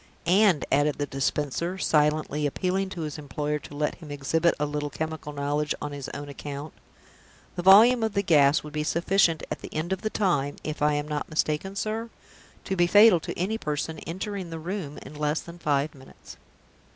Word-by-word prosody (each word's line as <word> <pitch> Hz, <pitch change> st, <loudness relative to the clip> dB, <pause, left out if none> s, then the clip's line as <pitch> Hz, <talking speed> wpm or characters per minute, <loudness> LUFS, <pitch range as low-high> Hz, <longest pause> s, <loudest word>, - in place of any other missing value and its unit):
And," 185 Hz, -2 st, +4 dB
added 145 Hz, +1 st, +2 dB
the 145 Hz, -, -1 dB
Dispenser, 145 Hz, +5 st, -2 dB
silently 150 Hz, -3 st, +1 dB
appealing 190 Hz, +5 st, -1 dB
to 185 Hz, -3 st, -6 dB
his 150 Hz, -1 st, -5 dB
employer 150 Hz, +1 st, -3 dB
to 145 Hz, -, -11 dB
let 150 Hz, +1 st, 0 dB
him 160 Hz, -3 st, -12 dB
exhibit 155 Hz, +4 st, +1 dB
a 150 Hz, -, +1 dB
little 145 Hz, 0 st, -3 dB
chemical 160 Hz, 0 st, -5 dB
knowledge 145 Hz, +1 st, -1 dB
on 145 Hz, -, -5 dB
his 140 Hz, -1 st, -6 dB
own 145 Hz, 0 st, -7 dB
account, 145 Hz, +1 st, -7 dB, 0.8 s
"the 175 Hz, -, -2 dB
volume 220 Hz, +7 st, +7 dB
of 220 Hz, -2 st, 0 dB
the 200 Hz, -, +2 dB
gas 145 Hz, -4 st, +4 dB
would 150 Hz, -1 st, -9 dB
be 150 Hz, 0 st, -1 dB
sufficient 170 Hz, +1 st, +2 dB
at -, -, -3 dB
the -, -, -9 dB
end 165 Hz, +4 st, -2 dB
of 190 Hz, -, -4 dB
the 215 Hz, -, -1 dB
time 145 Hz, -10 st, 0 dB
if 155 Hz, -1 st, -5 dB
I 150 Hz, 0 st, +3 dB
am 145 Hz, 0 st, -2 dB
not 150 Hz, -1 st, -3 dB
mistaken, 155 Hz, +5 st, -1 dB
sir? 220 Hz, +3 st, -3 dB, 0.5 s
to 190 Hz, -, -2 dB
be 175 Hz, -1 st, +3 dB
fatal 205 Hz, -1 st, +7 dB
to -, -, -6 dB
any 210 Hz, +6 st, -1 dB
person 150 Hz, 0 st, -3 dB
entering 190 Hz, +1 st, -5 dB
the 165 Hz, -, -5 dB
room 165 Hz, -3 st, -5 dB
in -, -, -11 dB
less 150 Hz, +1 st, -1 dB
than 170 Hz, 0 st, -11 dB
five 145 Hz, -1 st, 0 dB
minutes." 135 Hz, -1 st, -14 dB
155 Hz, 195 wpm, -26 LUFS, 145-185 Hz, 0.8 s, volume